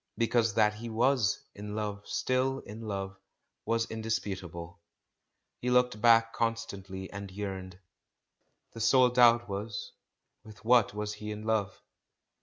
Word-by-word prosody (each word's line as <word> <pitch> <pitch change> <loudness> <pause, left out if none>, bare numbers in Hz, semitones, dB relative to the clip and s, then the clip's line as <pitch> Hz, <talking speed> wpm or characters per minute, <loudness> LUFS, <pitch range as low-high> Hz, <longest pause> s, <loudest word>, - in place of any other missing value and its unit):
Because 115 -2 +2
that 105 -1 +4
he 115 +2 -7
was 120 +1 +1
in 105 +1 -7
love, 105 -2 -4
still 130 +1 0
in 105 +2 -10
love, 95 -3 -4 0.5
was 115 +1 +1
indisputable; 95 -6 -4 0.8
he 125 - -2
looked 125 -3 +2
back 115 0 +5
constantly 100 -5 -3
and 100 -1 -7
yearned. 95 -2 -6 1.0
The 115 - -8
sole 125 +2 +5
doubt 120 -1 +5
was, 100 +1 -5 0.5
with 110 -1 -14
what 120 -3 +4
was 105 0 -3
he 105 0 -7
in 105 0 -5
love? 110 -4 -1
110 Hz, 130 wpm, -30 LUFS, 100-115 Hz, 1.0 s, back